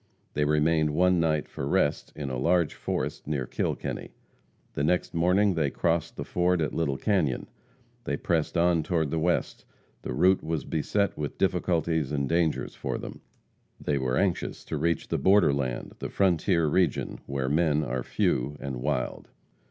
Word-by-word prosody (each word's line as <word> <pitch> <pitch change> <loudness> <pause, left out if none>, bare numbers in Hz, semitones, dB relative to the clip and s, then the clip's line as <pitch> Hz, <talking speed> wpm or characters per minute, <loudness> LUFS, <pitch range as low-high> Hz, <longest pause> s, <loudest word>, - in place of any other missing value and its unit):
They 75 - +1
remained 75 0 +2
one 90 +1 +4
night 80 -2 +1
for 70 - -5
rest - - +1
in 70 -3 -4
a 65 - -2
large 85 +3 +2
forest - - -3
near 70 -4 -1
Kilkenny. - - -3 0.6
The 70 - -2
next 90 +4 +1
morning 90 +4 +3
they 80 -4 +1
crossed 85 +2 -1
the - - -4
ford 90 0 +1
at 75 -3 -1
Little 70 -5 0
Canyon. 85 - 0 0.6
They - - -1
pressed 80 -2 0
on 85 -1 +3
toward 80 -2 0
the 80 - 0
west. 85 +2 0 0.4
The - - -5
route 90 +8 +3
was 80 -3 -2
beset 100 +6 0
with 75 -1 -4
difficulties 80 -4 +1
and 70 -2 0
dangers 85 -1 0
for - - -3
them. - - -8 0.6
They 70 -2 -1
were 65 -1 0
anxious - - -1
to - - -4
reach 85 +1 0
the - - 0
borderland, 70 -10 +2
the - - -4
frontier 90 -2 +2
region, 80 +1 +1
where 70 -1 -2
men 75 +1 +2
are 65 -2 -2
few 65 +3 0
and 65 -2 -4
wild. 65 0 -2
80 Hz, 165 wpm, -27 LUFS, 70-85 Hz, 0.6 s, one